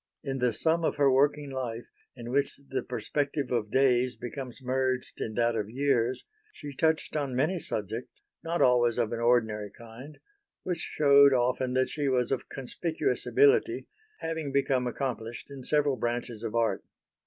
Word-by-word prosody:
In 135 -1 -3
the 125 -1 +2
sum 160 +9 +1
of - - +1
her 140 -2 +4
working 140 +1 +2
life, 120 -3 -4 0.3
in 120 -1 -7
which 140 +1 0
the 130 -1 -1
perspective 140 +3 -2
of 115 -4 0
days 125 0 +3
becomes 125 0 -7
merged 130 0 -1
in 110 - -3
that 120 0 +2
of 105 -2 -2
years, 130 -1 0 0.3
she 145 - -9
touched 160 +2 +1
on 140 -4 -1
many 155 +8 +1
subjects, 110 - -5 0.2
not 165 +1 +1
always 120 -2 +4
of 115 -3 0
an 115 - -3
ordinary 110 -3 +2
kind, 120 +8 -12 0.5
which 180 -2 -2 0.2
shewed 140 -1 +7
often 125 +1 +1
that 130 0 +2
she 145 -3 -1
was 125 -1 +1
of 135 - -2
conspicuous 160 - -2
ability, 425 +1 +3 0.4
having 160 -3 -3
become 135 -2 +1
accomplished 120 -1 -4
in 140 -1 -8
several 145 -1 +2
branches 120 -2 -3
of 115 -1 -4
art. 115 -1 +1
130 Hz, 165 wpm, -28 LUFS, 120-140 Hz, 0.5 s, shewed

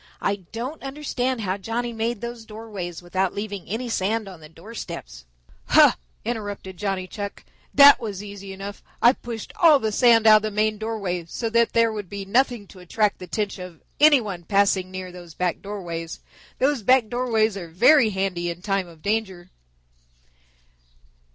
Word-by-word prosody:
I 200 - 0
don't 250 +8 -5
understand 265 -3 -2
how 190 -1 -1
Johnny 235 +4 -3
made 225 0 -2
those 235 -1 -6
doorways 210 -6 -7
without 185 +2 -1
leaving 205 -2 -5
any 230 +5 -3
sand 220 0 -1
on 185 -3 -10
the 155 -1 -13
doorsteps." 165 - -9 0.4
"Huh!" - - +7 0.3
interrupted 205 -5 -5
Johnny 195 -1 -2
Chuck. 200 +1 -7 0.3
"That 285 -1 +8
was 205 -5 -5
easy 200 -1 -9
enough. 195 +1 -8 0.2
I 240 - +6
pushed 235 -4 -8
all 325 -4 +7
the 220 -4 -2
sand 230 0 +5
out 215 -1 +9
of - - -1
the 215 - -2
main 215 0 0
doorway 200 -6 -3
so 225 +7 -4
that 235 0 +2
there 230 -1 +3
would 205 -4 -6
be 200 0 -6
nothing 240 +1 +1
to 190 - -14
attract 205 +4 0
the 185 - -7
attention 195 +1 -3
of 175 -4 -12 0.2
any 295 -2 +7
one 195 -5 -5
passing 195 0 +2
near 185 -1 -7
those 175 -2 -12
back 180 -2 -1
doorways. 170 -5 -6 0.4
Those 275 -1 +1
back 250 +1 +4
doorways 225 -3 +1
are 180 -4 -6
very 235 - +5
handy 190 -3 -2
in 170 +1 -7
time 195 -2 -1
of 165 -2 -16
danger." 195 -4 -2
205 Hz, 170 wpm, -24 LUFS, 185-230 Hz, 0.4 s, out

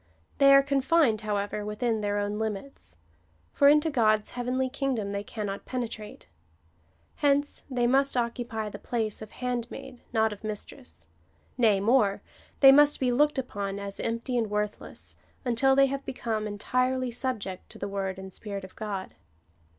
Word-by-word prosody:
They 275 0 +7
are 275 - +7
confined, 275 -3 +2
however, 205 0 -2
within 215 +1 -1
their 205 0 -1
own 205 +1 -2
limits; 210 - -5 0.6
for 280 - +5
into 300 +2 +4
God's 215 -5 +2
heavenly 250 +2 -1
kingdom 255 -6 -2
they 200 0 -3
cannot 205 -2 -5
penetrate. 230 -4 -5 0.9
Hence 285 0 +1
they 250 -2 0
must 270 +2 +2
occupy 235 -2 -2
the 205 - -9
place 220 -1 -2
of 215 - -8
handmaid, 250 +2 -5
not 220 -1 +2
of 205 - -13
mistress: 85 - -7 0.5
nay 220 -5 +4
more, 210 -1 +2 0.4
they 270 -1 +10
must 290 +1 +5
be 255 -2 +1
looked 295 +4 +3
upon 200 -6 -3
as 200 0 -6
empty 230 +2 -1
and 225 -2 -1
worth 210 0 -2
less, - - -11 0.3
until 255 +2 +3
they 275 0 +6
have 275 0 -3
become 220 -4 -3
entirely 255 +4 0
subject 225 -7 -4
to - - -9
the 200 - -4
word 195 -1 -3
and 190 -1 -9
Spirit 200 -2 -6
of 190 - -11
God. 200 -3 -5
230 Hz, 160 wpm, -28 LUFS, 205-260 Hz, 0.9 s, they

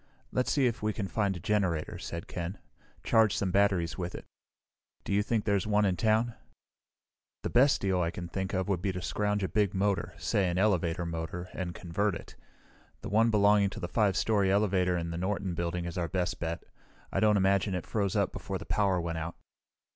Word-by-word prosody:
"Let's 125 - 0
see 140 -3 +3
if 120 -2 0
we 105 0 0
can 100 -2 -3
find 95 +1 0
a - - -7
generator," 90 -4 0
said 85 0 -6
Ken. 90 +3 -4 0.5
"Charge 110 -3 +4
some 95 -2 0
batteries 95 -3 +2
with 90 -1 -3
it. - - -8 0.8
Do - - -3
you 100 - +4
think 110 0 -1
there's 100 -2 +1
one 105 0 +3
in 95 -2 +2
town?" 110 +5 +2 1.1
"The - - -2
best 130 +3 +5
deal 95 -2 +1
I 85 - +1
can 85 0 -6
think 95 +2 -3
of 95 +1 0
would 95 -4 0
be 95 - 0
to 90 - -4
scrounge 105 0 0
a - - +1
big 100 -1 +1
motor, 100 +1 0
say 100 -5 +1
an 85 - -1
elevator 90 -4 +1
motor, 85 +2 -4
and 90 -2 -4
convert 95 +3 -1
it. - - -10 0.7
The - - -6
one 110 +3 +4
belonging 105 -1 +4
to - - -8
the 85 - -3
5 100 0 +2
story 100 -4 +2
elevator 95 -3 +2
in 85 -1 -3
the 85 - -4
Norton 95 0 -1
Building 85 +1 -2
is 85 +1 -4
our 85 - 0
best 90 +1 -2
bet. 85 0 -3 0.5
I - - 0
don't 105 -1 +4
imagine 95 0 +2
it 90 - -4
froze 100 -3 -1
up - - +2
before - - -4
the - - -9
power 100 -3 +1
went 85 -1 -3
out." 80 +2 -5
95 Hz, 210 wpm, -30 LUFS, 85-105 Hz, 1.1 s, best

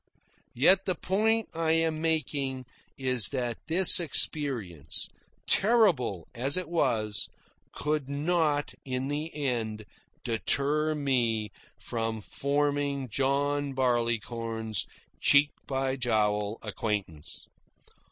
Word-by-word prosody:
Yet 185 +10 +5
the 185 - 0
point 220 +5 +1
I 160 -1 +1
am 160 -1 +1
making 140 -5 -1 0.3
is 125 -5 +3
that 120 -4 -3
this 180 +3 +6
experience, 120 - -1 0.4
terrible 180 - +2
as 135 +7 0
it 185 - -3
was, 110 - 0 0.4
could 150 -2 -2
not 150 0 0
in 130 0 -3
the 150 +3 -3
end 115 -7 -2 0.4
deter 145 +6 +1
me 120 -7 0 0.3
from 115 -1 -3
forming 140 +2 -1
John 140 +3 0
Barleycorn's 115 -3 -1 0.3
cheek 145 +1 +5 0.2
by 135 0 -1
jowl 105 -3 0
acquaintance. 100 -7 -4
135 Hz, 95 wpm, -28 LUFS, 115-150 Hz, 0.4 s, this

